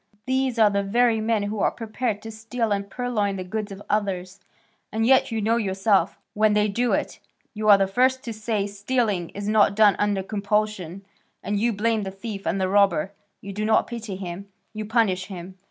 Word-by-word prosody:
These 260 Hz, -1 st, 0 dB
are 215 Hz, -2 st, +5 dB
the 200 Hz, 0 st, +1 dB
very 225 Hz, +2 st, +2 dB
men 220 Hz, -1 st, +1 dB
who 205 Hz, +1 st, -3 dB
are -, -, +3 dB
prepared 225 Hz, -1 st, -3 dB
to 225 Hz, -, -7 dB
steal 225 Hz, +1 st, -3 dB
and 200 Hz, 0 st, -1 dB
purloin 215 Hz, -4 st, -1 dB
the 185 Hz, -, -4 dB
goods 205 Hz, +3 st, -4 dB
of 195 Hz, +1 st, -9 dB
others, 195 Hz, -2 st, -2 dB, 0.5 s
and 220 Hz, +1 st, 0 dB
yet 260 Hz, 0 st, +4 dB
you 220 Hz, -2 st, -1 dB
know 225 Hz, +2 st, +2 dB
yourself, 195 Hz, -1 st, +1 dB, 0.2 s
when 215 Hz, 0 st, +3 dB
they 210 Hz, 0 st, +3 dB
do 235 Hz, +4 st, 0 dB
it, -, -, -2 dB, 0.3 s
you 215 Hz, -1 st, -1 dB
are 200 Hz, -, +9 dB
the 195 Hz, -, +2 dB
first 255 Hz, +6 st, +1 dB
to 235 Hz, -3 st, -5 dB
say 215 Hz, -1 st, -2 dB
stealing 205 Hz, -3 st, -1 dB
is 200 Hz, 0 st, -4 dB
not 210 Hz, -2 st, +4 dB
done 210 Hz, -2 st, +5 dB
under 205 Hz, -2 st, +1 dB
compulsion, 200 Hz, -2 st, -2 dB, 0.4 s
and 205 Hz, +1 st, -1 dB
you 235 Hz, +3 st, +2 dB
blame 220 Hz, +1 st, 0 dB
the 195 Hz, -, -4 dB
thief 195 Hz, +1 st, -7 dB
and 195 Hz, -, 0 dB
the 190 Hz, -, +1 dB
robber; 195 Hz, -2 st, +3 dB, 0.3 s
you 200 Hz, 0 st, -7 dB
do 210 Hz, +2 st, -3 dB
not 220 Hz, 0 st, +3 dB
pity 225 Hz, -4 st, -6 dB
him, 185 Hz, +1 st, -7 dB, 0.3 s
you 215 Hz, 0 st, -5 dB
punish 210 Hz, -5 st, +1 dB
him. 185 Hz, -1 st, -9 dB
210 Hz, 205 wpm, -24 LUFS, 195-225 Hz, 0.5 s, are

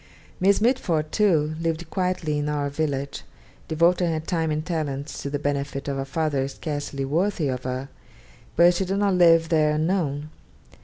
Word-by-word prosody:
Miss 195 Hz, +2 st, +4 dB
Mitford, 180 Hz, -, +1 dB
too, 160 Hz, -8 st, +2 dB
lived 165 Hz, 0 st, -2 dB
quietly 180 Hz, -5 st, -1 dB
in 145 Hz, 0 st, -1 dB
'Our 145 Hz, -1 st, -1 dB
Village,' 140 Hz, -2 st, -2 dB, 0.5 s
devoting 170 Hz, +2 st, +2 dB
her 160 Hz, -, -1 dB
time 160 Hz, 0 st, -1 dB
and 155 Hz, 0 st, -2 dB
talents 150 Hz, -4 st, -3 dB
to 140 Hz, -, -4 dB
the 145 Hz, -, -1 dB
benefit 140 Hz, -1 st, -3 dB
of 140 Hz, -1 st, -2 dB
a 135 Hz, -, -2 dB
father 140 Hz, -2 st, -1 dB
scarcely 145 Hz, -1 st, -4 dB
worthy 165 Hz, +1 st, 0 dB
of 125 Hz, -1 st, -4 dB
her; 130 Hz, +1 st, -3 dB, 0.7 s
but 175 Hz, +2 st, +6 dB
she 190 Hz, +2 st, -1 dB
did 195 Hz, +2 st, -1 dB
not 200 Hz, -1 st, +2 dB
live 165 Hz, -2 st, +5 dB
there 155 Hz, -2 st, +3 dB
unknown. 155 Hz, -3 st, -1 dB
155 Hz, 165 wpm, -24 LUFS, 145-175 Hz, 0.7 s, but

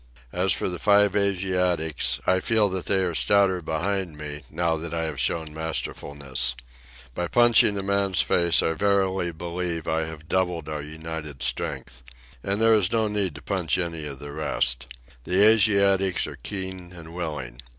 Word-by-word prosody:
As 90 Hz, +2 st, +1 dB
for -, -, 0 dB
the 90 Hz, -2 st, -4 dB
five 105 Hz, -1 st, +4 dB
Asiatics, 90 Hz, -9 st, 0 dB
I 95 Hz, 0 st, +3 dB
feel 110 Hz, 0 st, +2 dB
that 95 Hz, -1 st, -4 dB
they 95 Hz, -1 st, +2 dB
are 90 Hz, -2 st, -1 dB
stouter 95 Hz, +1 st, +2 dB
behind 85 Hz, +1 st, -2 dB
me 75 Hz, -1 st, -7 dB
now 85 Hz, 0 st, 0 dB
that 85 Hz, +1 st, -6 dB
I 80 Hz, -, -1 dB
have 80 Hz, -4 st, -4 dB
shown 80 Hz, +3 st, -1 dB
masterfulness. 70 Hz, -5 st, -3 dB, 0.6 s
By 90 Hz, +5 st, -3 dB
punching 120 Hz, -2 st, +4 dB
a 100 Hz, -, -3 dB
man's 100 Hz, -2 st, +1 dB
face 85 Hz, -1 st, +3 dB
I 80 Hz, -, +1 dB
verily 95 Hz, 0 st, +1 dB
believe 85 Hz, 0 st, -4 dB
I 80 Hz, 0 st, 0 dB
have 80 Hz, -1 st, -10 dB
doubled 90 Hz, -3 st, -1 dB
our 75 Hz, -1 st, -4 dB
united 80 Hz, -2 st, -7 dB
strength. 65 Hz, 0 st, -2 dB, 0.4 s
And 100 Hz, -, -2 dB
there 115 Hz, 0 st, +5 dB
is 100 Hz, -4 st, +2 dB
no 110 Hz, -1 st, +1 dB
need 100 Hz, -6 st, -1 dB
to 70 Hz, -, -11 dB
punch 90 Hz, -7 st, 0 dB
any 85 Hz, -4 st, -3 dB
of 70 Hz, -2 st, -8 dB
the 70 Hz, +2 st, -9 dB
rest. 65 Hz, -5 st, +1 dB, 0.4 s
The 95 Hz, +3 st, +4 dB
Asiatics 100 Hz, -3 st, +4 dB
are -, -, -7 dB
keen 95 Hz, -2 st, -6 dB
and 85 Hz, -2 st, -11 dB
willing. 75 Hz, -9 st, -5 dB
85 Hz, 170 wpm, -25 LUFS, 80-95 Hz, 0.6 s, there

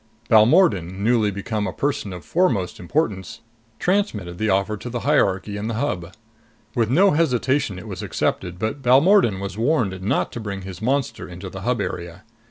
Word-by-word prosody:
Balmordan, 105 Hz, -, +4 dB
newly 115 Hz, -2 st, +3 dB
become 105 Hz, +2 st, -3 dB
a -, -, -2 dB
person 140 Hz, -8 st, -2 dB
of 90 Hz, -4 st, -8 dB
foremost 115 Hz, -, 0 dB
importance, 95 Hz, -, -2 dB, 0.4 s
transmitted 105 Hz, -, -1 dB
the 110 Hz, 0 st, 0 dB
offer 100 Hz, +3 st, +1 dB
to 120 Hz, -, -7 dB
the 120 Hz, -1 st, -4 dB
hierarchy 100 Hz, -8 st, +1 dB
in 105 Hz, +2 st, -4 dB
the 115 Hz, -, -2 dB
Hub. 90 Hz, -9 st, -2 dB, 0.6 s
With 115 Hz, -3 st, +1 dB
no 185 Hz, +10 st, +5 dB
hesitation 135 Hz, -, +1 dB
it 90 Hz, -, -9 dB
was -, -, -6 dB
accepted, 90 Hz, -1 st, -2 dB
but 110 Hz, +8 st, -3 dB
Balmordan 135 Hz, -, +4 dB
was 100 Hz, +1 st, -5 dB
warned 115 Hz, -, +1 dB
not 95 Hz, -, 0 dB
to -, -, -6 dB
bring 100 Hz, -3 st, -5 dB
his 95 Hz, 0 st, -8 dB
monster 135 Hz, +3 st, -1 dB
into 90 Hz, +1 st, -8 dB
the 95 Hz, -, -7 dB
Hub 120 Hz, +3 st, 0 dB
area. 85 Hz, +2 st, -5 dB
110 Hz, 175 wpm, -22 LUFS, 95-130 Hz, 0.6 s, no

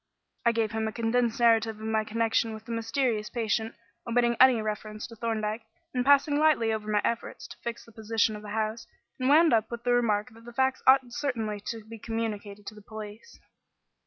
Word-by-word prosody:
I -, -, +6 dB
gave 225 Hz, -2 st, 0 dB
him 220 Hz, 0 st, -1 dB
a -, -, -2 dB
condensed 235 Hz, +1 st, 0 dB
narrative 225 Hz, -2 st, +3 dB
of 220 Hz, -, -7 dB
my 220 Hz, 0 st, +1 dB
connection 225 Hz, 0 st, 0 dB
with 220 Hz, 0 st, -12 dB
the 235 Hz, -, -7 dB
mysterious 230 Hz, -1 st, -1 dB
patient, 225 Hz, -1 st, -1 dB, 0.3 s
omitting 235 Hz, 0 st, +2 dB
any 255 Hz, -2 st, +7 dB
reference 215 Hz, 0 st, -4 dB
to 230 Hz, -, -11 dB
Thorndyke, 220 Hz, -1 st, -2 dB, 0.3 s
and 250 Hz, -1 st, 0 dB
passing 285 Hz, +2 st, +4 dB
lightly 290 Hz, -8 st, +3 dB
over 215 Hz, -1 st, -4 dB
my 210 Hz, -1 st, +2 dB
efforts 235 Hz, 0 st, -3 dB
to -, -, -11 dB
fix 235 Hz, 0 st, -5 dB
the 230 Hz, -, -16 dB
position 220 Hz, 0 st, 0 dB
of 210 Hz, -, -8 dB
the 210 Hz, -, -9 dB
house, 220 Hz, +1 st, -2 dB, 0.3 s
and 255 Hz, +1 st, +1 dB
wound 315 Hz, +1 st, +6 dB
up 220 Hz, -1 st, +2 dB
with 235 Hz, 0 st, -6 dB
the 245 Hz, 0 st, +2 dB
remark 230 Hz, -1 st, +1 dB
that 225 Hz, +1 st, -17 dB
the 240 Hz, -, -10 dB
facts 265 Hz, +1 st, +1 dB
ought 265 Hz, +1 st, +8 dB
certainly 225 Hz, -6 st, -2 dB
to 225 Hz, -2 st, -5 dB
be 225 Hz, 0 st, -10 dB
communicated 210 Hz, -2 st, -4 dB
to -, -, -7 dB
the 210 Hz, -, -13 dB
police. 215 Hz, -, -10 dB
225 Hz, 205 wpm, -28 LUFS, 215-240 Hz, 0.3 s, ought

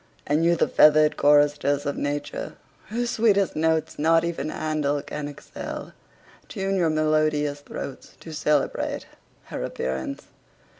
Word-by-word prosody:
and 150 Hz, +3 st, +1 dB
you 170 Hz, +1 st, +4 dB
the -, -, +2 dB
feathered 150 Hz, 0 st, +5 dB
choristers 145 Hz, 0 st, +3 dB
of 145 Hz, -, -1 dB
nature, 145 Hz, 0 st, -4 dB, 0.3 s
whose 240 Hz, +2 st, -1 dB
sweetest 205 Hz, -5 st, +2 dB
notes 160 Hz, -1 st, 0 dB
not 165 Hz, +2 st, +4 dB
even 170 Hz, -3 st, -2 dB
Handel 150 Hz, -2 st, -1 dB
can 150 Hz, -1 st, -5 dB
excell, 145 Hz, -, -8 dB, 0.5 s
tune 195 Hz, -2 st, -2 dB
your 175 Hz, -4 st, +2 dB
melodious 155 Hz, -2 st, +1 dB
throats 140 Hz, -, -8 dB
to 160 Hz, -, -9 dB
celebrate 150 Hz, -2 st, 0 dB, 0.4 s
her -, -, -6 dB
appearance. 65 Hz, 0 st, -4 dB
155 Hz, 130 wpm, -25 LUFS, 145-165 Hz, 0.5 s, feathered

